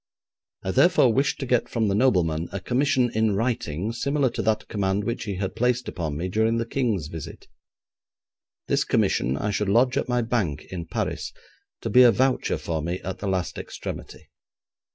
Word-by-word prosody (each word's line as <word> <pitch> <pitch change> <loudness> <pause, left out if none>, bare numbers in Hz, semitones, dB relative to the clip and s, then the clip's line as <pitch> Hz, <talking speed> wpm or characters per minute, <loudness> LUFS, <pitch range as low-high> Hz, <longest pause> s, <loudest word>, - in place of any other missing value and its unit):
I 95 - -1
therefore 130 - +4
wished 135 +4 +1
to - - -2
get 125 -1 +1
from 115 -2 0
the 100 - +1
nobleman 90 -8 +2
a 100 - -3
commission 130 +3 +1
in 110 -2 +2
writing, 110 -5 -1
similar 140 +1 0
to - - -3
that 110 -1 0
command 100 -1 -1
which 115 +3 -3
he 100 -3 -3
had 95 0 -3
placed 125 +1 +1
upon 80 -5 -3
me 85 +4 -2
during 110 +4 +1
the 115 - -1
King's 115 - -1
visit. 80 0 -8 1.2
This - - +2
commission 65 +3 +1
I 105 - -1
should 100 0 -1
lodge 125 +5 +3
at - - -1
my 125 -1 +1
bank 105 - -1
in 85 -3 -5
Paris, - - -3 0.5
to - - -3
be 125 - +7
a 125 - +8
voucher 130 +2 +1
for 80 -2 -3
me 85 +4 -3
at 95 - -5
the 100 - -4
last 95 -2 -2
extremity. - - -8
110 Hz, 185 wpm, -25 LUFS, 90-125 Hz, 1.2 s, a